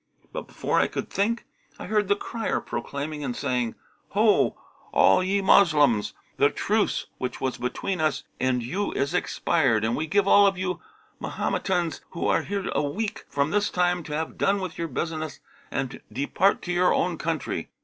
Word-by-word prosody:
But, - - -5
before - - 0
I - - +3
could - - -5
think, 225 +4 0 0.3
I - - -7
heard 210 -2 +1
the 200 - +3
crier 225 +2 -2
proclaiming 145 +5 -4
and 125 -3 -3
saying, 125 -3 -1 0.4
'Ho, - - +3 0.3
all 95 - +5
ye 195 +2 +1
Moslems, 145 - +4 0.2
the - - +5
truce - - 0
which 125 - -3
was 130 -1 -2
between 155 +8 -2
us 155 -2 +1 0.2
and 130 -2 +1
you 185 - -2
is 140 +4 -1
expired, 135 -10 +1
and 115 +2 +1
we 155 - -2
give 200 +2 +2
all 200 0 +7
of 195 -1 +1
you 180 -1 -2 0.4
Mahometans 175 -5 -1
who 170 - -3
are - - +3
here 200 -1 -3
a - - +2
week 205 +9 -3
from 140 +2 0
this 205 +1 +2
time 180 0 +1
to 150 - -6
have 160 +1 -3
done 200 +1 +2
with 185 -3 -5
your 170 - -3
business 155 +1 -4 0.3
and 135 -2 -3
depart 170 +8 +1
to 180 - -2
your 180 +1 +4
own 175 -2 0
country.' 160 -2 -2
165 Hz, 180 wpm, -26 LUFS, 140-195 Hz, 0.4 s, all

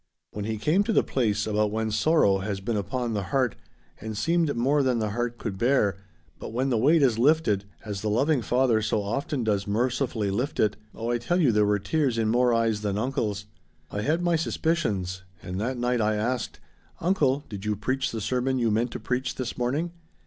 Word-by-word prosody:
When 105 -1 -5
he 110 0 -2
came 155 - +2
to 225 - 0
the - - +4
place 105 -5 0
about 105 0 +1
when 110 +1 -2
sorrow 110 -4 +3
has 95 0 -3
been 110 +4 -2
upon 120 +3 -2
the 105 - -1
heart, 130 -5 +1 0.5
and 110 0 -6
seemed 165 +3 +1
more 135 +5 +2
than 130 -3 +1
the 110 -2 -1
heart 120 +2 -2
could 100 -6 -5
bear, 120 -6 +2 0.4
but - - -7
when 130 +4 0
the 120 - +2
weight 150 +6 +4
is 120 -4 +3
lifted, 125 -8 +3 0.2
as 100 -3 -4
the 105 - -1
loving 135 +6 +2
Father 125 -2 +2
so 105 -1 0
often 135 +5 -2
does 105 -2 0
mercifully 115 -1 0
lift 125 +8 -2
it 105 -1 +2 0.2
oh 115 +1 -3
I 120 - 0
tell 175 +9 0
you 145 -8 +4
there 105 -1 +3
were 105 0 +3
tears 130 +4 0
in 110 -1 +1
more 125 +2 +3
eyes 115 -2 +1
than 100 -1 -1
uncle's. 105 -4 -2 0.5
I 105 - -2
had 160 +10 0
my 175 -1 +2
suspicions, 110 - -1 0.2
and 90 +2 -4
that 125 +3 -2
night 120 0 0
I 105 0 +2
asked, 120 +2 -2 0.4
'Uncle, 145 -6 +1
did 100 -2 -7
you 105 0 0
preach 130 +6 -1
the 110 - -4
sermon 130 +4 0
you 115 -3 +1
meant 115 +3 +1
to - - -4
preach 125 +1 -2
this 125 -2 -4
morning?' 140 +8 -1
115 Hz, 210 wpm, -26 LUFS, 105-135 Hz, 0.5 s, the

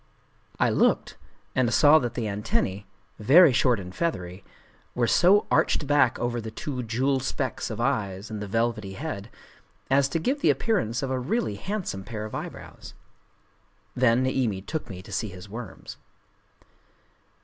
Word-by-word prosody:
I - - +3
looked, - - +1 0.4
and 125 -3 +1
saw 150 +4 +6
that 120 -4 -4
the 115 -3 -2
antennae, 100 -1 -2 0.3
very 145 - +7
short 120 -2 +3
and 90 -1 -8
feathery, 95 - -3 0.5
were 120 - +2
so 190 - +4
arched - - +2
back 145 -4 +3
over 120 0 -2
the 110 - -6
two 125 +4 -5
jewel 130 +4 0
specks 130 -1 -3
of - - -5
eyes 110 -6 -2
in 110 - -4
the 105 - -5
velvety 110 -2 -1
head, 110 -5 -6 0.6
as 135 0 +4
to 165 - -1
give 265 - -1
the - - +4
appearance 160 - 0
of 135 - -2
a 130 - 0
really 135 - -1
handsome 175 - -4
pair 110 0 -6
of 110 - -9
eyebrows. - - -8 1.0
Then 125 0 +3
Niimi 120 -7 -1
took 155 -5 -4
me 95 -2 -8
to 105 - -13
see 105 +2 -2
his 90 +1 -11
worms. 105 -2 -9
120 Hz, 160 wpm, -26 LUFS, 105-140 Hz, 1.0 s, very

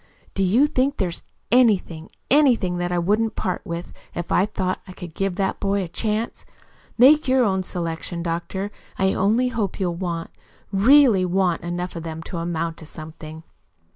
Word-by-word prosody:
"Do 195 - -2
you 220 +10 +4
think 280 -1 0
there's 180 -4 -2 0.3
anything, 200 -9 +2 0.2
ANYTHING 240 -11 +3
that 175 0 -2
I 175 - 0
wouldn't 210 +6 +1
part 185 - -2
with, 170 +1 -6 0.2
if 175 - -4
I 195 - +3
thought 185 -3 -2
I 185 - -9
could 175 -3 -9
give 195 0 -1
that 195 0 -1
boy 200 0 0
a - - -5
chance? 215 +6 -2 0.5
Make 275 +5 +6
your 260 0 +4
own 190 -4 +1
selection, 170 -1 -4
doctor. 175 +4 -3 0.3
I 190 0 +2
only 225 +6 +2
hope 220 -6 -3
you'll 180 -3 0
want 170 -2 -4 0.4
really 230 0 +5
WANT 180 -1 +1
enough 175 +1 -4
of 165 - -4
them 160 0 -6
to 175 - -6
amount 165 -1 -2
to 160 - -11
something." 155 0 -9
185 Hz, 170 wpm, -23 LUFS, 170-215 Hz, 0.5 s, Make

